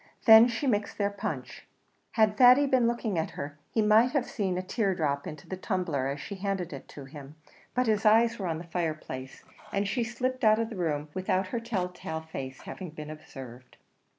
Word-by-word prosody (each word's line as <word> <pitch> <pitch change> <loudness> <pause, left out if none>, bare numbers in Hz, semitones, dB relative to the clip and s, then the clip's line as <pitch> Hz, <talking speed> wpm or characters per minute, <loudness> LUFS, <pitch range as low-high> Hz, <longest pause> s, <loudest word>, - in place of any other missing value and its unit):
Then 225 0 +10
she 240 +4 -3
mixed 210 -5 0
their 200 -1 +1
punch. 200 - -6 0.5
Had 215 -2 +3
Thady 255 +4 +7
been 255 -3 +3
looking 230 -6 -1
at 160 - -1
her 145 +1 -7
he 220 - +1
might 220 +5 +5
have 275 -4 +1
seen 190 -4 -2
a 185 - -2
tear 195 0 0
drop 140 -4 -1
into 150 -2 -9
the 190 - -4
tumbler 180 - -1
as 140 +1 -3
she 200 - -7
handed 195 -4 -3
it 135 - -9
to 140 - -10
him; 145 +1 -11 0.4
but 250 0 +2
his 215 -2 +1
eyes 225 +1 +4
were 190 - -2
on 165 -2 -1
the 165 - -7
fireplace, 155 -6 -4 0.3
and 200 -1 0
she 235 +4 0
slipped 255 +2 -3
out 215 -1 +6
of 230 +1 -2
the - - -6
room 155 -4 -2
without 185 0 0
her 235 - -2
tell 220 -6 -2
tale 160 -3 -6
face 135 -5 -7
having 185 -3 -7
been 150 -1 -8
observed. 130 -5 -11
190 Hz, 205 wpm, -28 LUFS, 155-225 Hz, 0.5 s, Then